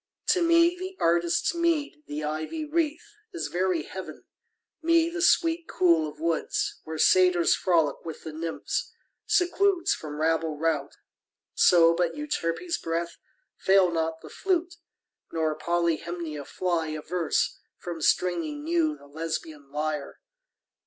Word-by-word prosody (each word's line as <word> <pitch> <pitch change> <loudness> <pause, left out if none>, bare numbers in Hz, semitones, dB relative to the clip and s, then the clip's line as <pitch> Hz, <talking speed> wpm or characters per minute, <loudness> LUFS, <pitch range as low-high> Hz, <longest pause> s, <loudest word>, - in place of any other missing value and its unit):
To 365 - +4
me 335 +1 +5
the 375 +1 -7
artist's 170 - +2
meed, 335 -3 0
the 150 +1 -4
ivy 155 - -3
wreath 315 +1 -1 0.3
Is 345 - -3
very 180 -3 0
heaven: 190 +3 -8 0.6
me 335 0 +3
the 350 0 -3
sweet 335 -1 +3
cool 170 -4 +3
of 150 - -14
woods, 165 0 -1
Where 160 0 -5
Satyrs 180 0 +4
frolic 165 -6 +1
with 160 -2 -8
the 160 - -7
Nymphs, 165 +1 -3 0.4
secludes 365 0 +2
From 150 -1 -7
rabble 160 -1 0
rout, 150 -3 -1 0.6
so 165 -2 +6
but 170 0 0
Euterpe's 295 - -2
breath 170 +1 -3 0.4
Fail 190 -2 +4
not 160 -1 -2
the - - -11
flute, 355 -2 -1 0.6
nor 160 -1 0
Polyhymnia 170 -2 -2
fly 170 -1 -1
Averse 155 +2 -1 0.2
from 170 -2 -6
stringing 290 - +1
new 320 -1 +1
the - - -17
Lesbian 155 -1 -5
lyre. 150 0 -3
170 Hz, 130 wpm, -27 LUFS, -, 0.6 s, so